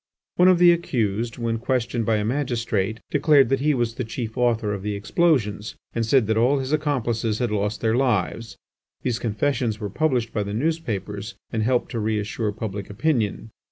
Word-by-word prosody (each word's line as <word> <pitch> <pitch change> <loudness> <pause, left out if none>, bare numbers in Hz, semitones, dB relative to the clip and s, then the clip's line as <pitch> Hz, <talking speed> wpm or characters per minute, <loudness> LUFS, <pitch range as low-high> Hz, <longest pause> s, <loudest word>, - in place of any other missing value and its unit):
One 180 - +6
of 185 -1 +6
the 175 0 +7
accused, 115 -9 -1
when 115 -1 -1
questioned 120 -2 -1
by 115 - +3
a 105 -1 0
magistrate, 115 -5 -1
declared 145 -3 +4
that 135 - +2
he 150 +1 +2
was 120 -2 0
the 125 - -3
chief 115 0 -5
author 115 -4 +1
of 100 - -4
the 105 +1 -3
explosions, 105 -2 0 0.2
and 115 - 0
said 120 +1 +3
that 110 +1 0
all 125 +5 +3
his 135 +2 -2
accomplices 120 -7 0
had 120 -2 -1
lost 105 0 -1
their 110 0 +2
lives. 115 -3 0 0.5
These 120 -2 -1
confessions 115 0 -1
were 105 -3 -4
published 125 -4 0
by 105 - 0
the 100 0 -3
newspapers 110 - -2 0.2
and 110 - -1
helped 125 +2 +1
to 120 - -2
reassure 105 0 -1
public 105 -2 -5
opinion. 110 -2 -1
115 Hz, 185 wpm, -23 LUFS, 105-130 Hz, 0.5 s, the